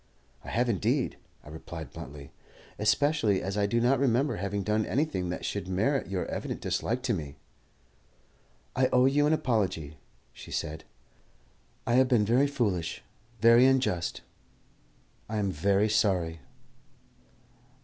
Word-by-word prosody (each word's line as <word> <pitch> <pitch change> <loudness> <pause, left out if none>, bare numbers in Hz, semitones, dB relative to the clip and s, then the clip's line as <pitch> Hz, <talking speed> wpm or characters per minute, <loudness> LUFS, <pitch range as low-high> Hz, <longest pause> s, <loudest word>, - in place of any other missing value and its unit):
"I - - -8
have 120 +2 +1
indeed," 100 -8 0 0.3
I - - -12
replied 80 0 -8
bluntly, 70 +1 -9 0.5
"especially 110 -1 +2
as 95 +2 -3
I 100 -1 +1
do 115 +3 +1
not 125 +2 +3
remember 135 +2 +1
having 100 +2 -2
done 105 +2 +1
anything 105 - -1
that 90 - -4
should 100 -2 -3
merit 110 +10 0
your 95 -2 -2
evident - - -4
dislike 125 +3 -2
to 125 -3 +1
me." 75 -7 -5 1.4
"I 130 0 +3
owe 125 0 +5
you 145 +2 +3
an - - +2
apology," 95 - -1 0.3
she - - -12
said. 80 0 -4 1.0
"I 120 - 0
have 130 - +3
been 120 -5 +3
very 125 +6 +3
foolish, 105 -12 -2 0.4
very 115 +3 +7
unjust. 130 -10 0 1.1
I 110 - -2
am 100 -2 0
very 100 +5 +2
sorry." 95 -6 +1
105 Hz, 140 wpm, -28 LUFS, 90-125 Hz, 1.4 s, very